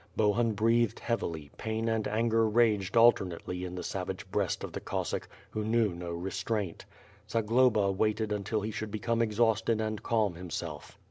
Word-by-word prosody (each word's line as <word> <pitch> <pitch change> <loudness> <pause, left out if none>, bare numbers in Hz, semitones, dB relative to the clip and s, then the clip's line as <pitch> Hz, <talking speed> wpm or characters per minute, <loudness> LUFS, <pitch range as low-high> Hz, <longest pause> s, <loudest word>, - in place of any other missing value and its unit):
Bohun 110 +2 +3
breathed 115 +1 +2
heavily, 80 -11 -3
pain 110 0 -2
and 115 -1 0
anger 115 +1 +2
raged 105 -3 +2
alternately 90 -6 +3
in 90 0 -5
the 90 - -5
savage - - -4
breast - - 0
of - - -5
the - - -3
Cossack, - - -3 0.2
who 110 - -2
knew 110 -2 +2
no 85 0 -6
re.^'traint. 95 +2 -3 0.4
Zagloba 115 -2 +3
waited 110 +2 0
until 105 +1 -1
he 110 +2 -3
should 110 0 -4
become 115 +2 -1
exhausted 115 0 +2
and 110 -1 -2
calm 110 -5 +1
himself. 85 -1 -6
110 Hz, 155 wpm, -30 LUFS, 100-115 Hz, 0.4 s, Bohun